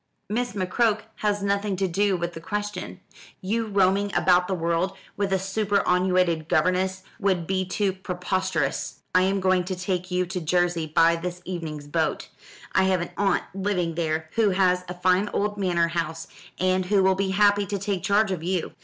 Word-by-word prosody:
"Miss 240 +4 -2
McCroke 210 +3 +1 0.2
has 205 -1 0
nothing 200 0 0
to 190 +1 0
do 195 +2 +1
with 175 0 -3
the 165 - -8
question. 210 +4 -4 0.4
You 220 +4 -1
roaming 200 0 +2
about 180 -1 +4
the 190 - -1
world 170 +3 -1 0.2
with 200 -1 -1
a 190 - +3
superannuated 185 -4 +1
governess 185 +3 +1 0.2
would 190 -5 +1
be 190 +1 -1
too 190 +2 0
preposterous. 180 -4 -2
I 185 - +5
am 195 +1 +1
going 185 -1 +2
to 185 +1 -3
take 180 0 -3
you 180 0 0
to 180 0 -4
Jersey 175 0 +1
by 165 +2 +4
this 180 +1 -5
evening's 160 -5 -5
boat. 155 +2 -1 0.4
I 190 - +3
have 185 -2 +2
an 175 - -5
aunt 195 -2 +1
living 190 -3 -1
there 160 -1 -2
who 225 -2 +3
has 185 -1 +2
a 180 - -5
fine 185 +3 +2
old 205 0 0
manor 175 -3 +1
house, 165 -1 -3 0.3
and 185 0 +2
who 200 -1 +3
will 190 0 +4
be 190 0 -1
happy 205 +1 +3
to 200 +1 -2
take 195 -1 -2
charge 205 0 +2
of 180 -4 -2
you. 180 0 -2
185 Hz, 180 wpm, -25 LUFS, 175-200 Hz, 0.4 s, I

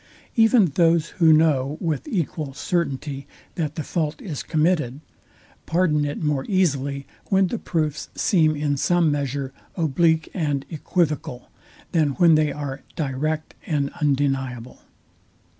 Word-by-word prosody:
Even 225 -2 +5
those, 165 0 +2
who 160 -1 +7
know 150 -2 +3
with 160 - -2
equal 155 - -3
certainty, 140 -5 -2 0.3
that 155 -3 -3
the 155 - -3
fault 155 -1 -2
is 155 -8 -5
committed, 155 -5 0 0.7
pardon 160 -4 +2
it 145 +2 -4
more 145 -3 0
easily, 140 -7 0 0.2
when 195 -1 +3
the 220 +5 -3
proofs 155 -3 -2
seem 160 -6 +3
in 145 -1 -1
some 170 +1 +2
measure 140 -1 -2 0.2
oblique 160 0 +2
and 145 -6 -1
equivocal, 155 -6 -2 0.4
than 155 -4 +2
when 165 +5 +5
they 155 -1 +3
are 140 -1 -5
direct 155 +2 -2
and 145 -4 0
undeniable. 135 -4 -1
150 Hz, 125 wpm, -23 LUFS, 140-165 Hz, 0.7 s, who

